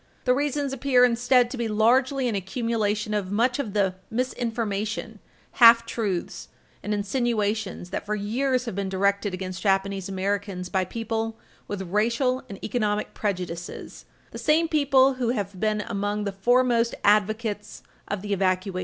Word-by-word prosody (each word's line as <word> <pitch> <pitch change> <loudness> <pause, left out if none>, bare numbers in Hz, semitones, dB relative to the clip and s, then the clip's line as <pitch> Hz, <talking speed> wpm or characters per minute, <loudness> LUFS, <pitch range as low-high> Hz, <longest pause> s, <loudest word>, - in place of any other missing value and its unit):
The 250 - +4
reasons 285 0 -1
appear, 265 -2 +4
instead, 245 0 +3
to 265 - -5
be 235 - 0
largely 255 +5 +2
an 235 - -1
accumulation 210 +1 -1
of 200 -3 -2
much 245 +5 +1
of 225 -8 -3
the 195 -3 +2 0.2
misinformation, 225 -3 -3 0.4
half 230 0 +9
truths 200 -8 -3 0.3
and 210 - -4
insinuations 210 -3 -1
that 200 - -4
for 210 - 0
years 250 +5 0
have 230 - -4
been 195 0 -3
directed 200 +1 0
against 185 -1 -6
Japanese 195 -1 0
Americans 195 -1 -2
by 190 -1 0
people 225 +2 -3 0.3
with 205 -2 -4
racial 235 +7 0
and 200 - -7
economic 210 -3 -1
prejudices 180 -4 -5 0.3
the - - -7
same 320 +2 +3
people 275 -4 +4
who 255 -2 -2
have 200 -5 -3
been 215 0 0
among 205 +1 -2
the 200 - -2
foremost 235 +3 +2
advocates 210 +1 +1 0.2
of 205 -1 -4
the 205 -1 -2
evacuation. 185 -1 0
215 Hz, 150 wpm, -25 LUFS, 200-245 Hz, 0.4 s, half